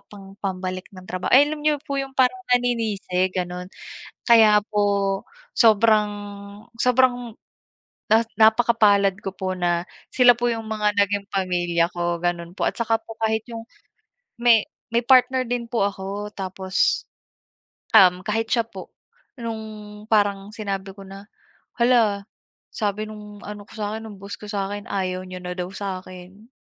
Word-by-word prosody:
pang 200 -2 -11
pambalik 185 -1 -4
ng 185 -1 -11
trabaho" 185 0 -3
ay, 285 +3 +7
alam 305 - -5
niyo 300 -1 +3
po 280 -2 -3
yung 270 0 -6
parang 260 +9 +3
naninisi 220 -7 0
gano'n. 180 0 -4 0.6
Kaya 220 -3 +7
po 200 -2 +1 0.3
sobrang, 215 -2 +4 0.7
sobrang 250 -1 +2 0.8
na 220 +1 +6 0.2
napakapalad 220 -3 +4
ko 195 - -4
po 185 0 -3
na 175 -1 +1 0.3
sila 250 -1 +7
po 240 - -1
yung 225 -1 -4
mga 210 -1 0
naging 200 0 +1
pamilya 175 -3 +1
ko 175 -1 -2
gano'n 175 -1 -2
po - - +1
at - - -12
saka 225 -1 +1
po 225 0 -11
kahit 220 0 +1
yung, 225 -1 -6 0.8
may 235 -3 +5 0.3
may 235 - +2
partner 260 0 +4
din 240 -1 -3
po 230 -4 +1
ako 200 +1 -5
tapos, 190 -1 -1 0.9
um, 180 -3 +7
kahit 225 +1 -1
siya 235 -2 +3
po 195 -4 -10 0.5
nung 215 -2 -7
parang 205 -2 +2
sinabi 195 -3 -4
ko 195 0 -12
na 195 +1 -10 0.6
"Hala, 230 -5 +3 0.5
sabi 210 -1 -2
nung 210 -1 -11
ano 205 0 -8
ko - - -18
sa 210 -1 -3
akin 220 - -6
ng 205 - -10
boss 200 - -7
ko 210 - -9
sa'kin 205 0 -4
ayaw 185 -1 -2
niya 185 0 -8
na 180 0 -5
daw 180 - -2
sa 195 -2 -4
akin. 185 +4 -13
205 Hz, 155 wpm, -23 LUFS, 190-225 Hz, 0.9 s, ay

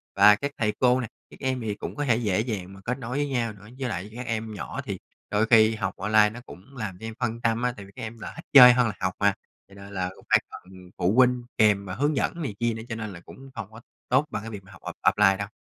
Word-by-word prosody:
Và 105 0 +8
các 140 +6 -4
thầy 105 -5 0
cô 125 0 +4
nè, 120 - -3 0.2
các - - -15
em 130 -2 -1
thì 105 -2 -3
cũng - - -7
có 145 -1 -2
thể 120 - +3
dễ 105 -5 0
dàng 100 -5 -4
mà 95 - -12
kết 125 +2 -1
nối 125 +1 -4
với 145 - 0
nhau 120 -5 -1
nữa. 105 +1 -15
Với 130 - -2
lại 100 0 -5
các 125 +1 -6
em 110 -2 -3
nhỏ 105 - -5
thì - - -5 0.3
đôi 105 +1 +2
khi 110 -1 +5
học 100 -3 -2
online 105 +1 +4
nó 115 - -9
cũng 130 +9 -14
làm 100 -6 -5
cho 110 - -8
em 115 - -5
phân 115 -2 -2
tâm 115 0 +1
á, 125 -1 0
tại 100 - -9
vì 100 - -16
các - - -8
em 115 +1 -7
là - - -7
thích 165 - -10
chơi 125 -3 +11
hơn 125 -2 +2
học 95 0 -1
mà, 100 -1 +4 0.3
cho 100 - -17
nên 100 0 -11
là 90 -1 -2
cũng - - -18
phải - - +6
cần 90 0 -13
phụ 90 +2 +1
huynh 125 -1 +4
kèm 105 -2 +4
và 90 - -5
hướng 145 +6 +1
dẫn 170 +5 -1
này 120 -10 -4
kia 120 -1 +1
nữa, 110 - -7
cho 115 - -3
nên 110 -2 -5
là 85 - -9
cũng 135 +9 -13
không 105 -2 -7
có 110 +1 -12 0.3
tốt 130 +4 +3
bằng 105 - -4
cái 115 - -6
việc 100 -3 -8
mà 95 - -17
học 90 - -15
off - - 0
offline 95 -2 +4
đâu. 100 - -4
110 Hz, 295 wpm, -26 LUFS, 100-125 Hz, 0.3 s, chơi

